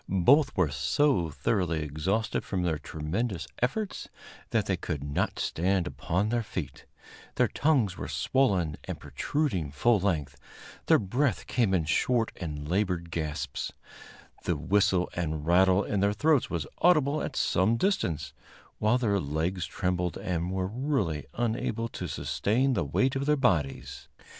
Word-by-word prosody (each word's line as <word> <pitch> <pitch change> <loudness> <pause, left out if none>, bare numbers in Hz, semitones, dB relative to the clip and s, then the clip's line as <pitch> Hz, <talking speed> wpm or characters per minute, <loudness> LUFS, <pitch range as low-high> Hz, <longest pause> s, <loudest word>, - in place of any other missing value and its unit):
Both 130 - +4
were 85 -6 +2
so 85 - +2
thoroughly 85 0 0
exhausted 90 +9 -1
from 95 -3 -2
their 80 -3 0
tremendous 85 +7 -3
efforts 190 - -2 0.4
that 110 -3 +1
they 95 - +1
could 80 -5 -4
not 70 0 -1
stand 90 +1 0
upon 80 +8 -1
their 120 +1 +1
feet; 85 -10 -6 0.5
their - - +3
tongues 130 -12 +1
were - - -4
swollen 95 - +1
and - - -5
protruding 135 - -2
full 110 +10 +2
length, 80 -7 -1 0.5
their - - +6
breath 120 +4 0
came 115 -6 +1
in 90 -5 +2
short 115 +9 +1
and 75 -3 -5
labored 90 -2 -1
gasps, 75 -5 -3 0.7
the 85 - 0
whistle 90 +3 +2
and 80 -3 -3
rattle 95 +3 +4
in 105 - -1
their 100 +1 +2
throats 150 +4 +2
was 85 -4 -2
audible 155 -4 +3
at - - -4
some 100 +6 +2
distance, 80 - 0 0.5
while 110 +4 +3
their 105 -5 +1
legs 80 +4 -2
trembled 90 0 -1
and 85 -1 -2
were 95 -1 -1
really 100 - -1
unable 115 -1 -1
to - - -5
sustain 130 +6 0
the 100 - +1
weight 130 - +1
of 135 +1 -2
their 150 - +4
bodies. 85 - 0
95 Hz, 150 wpm, -28 LUFS, 80-115 Hz, 0.7 s, their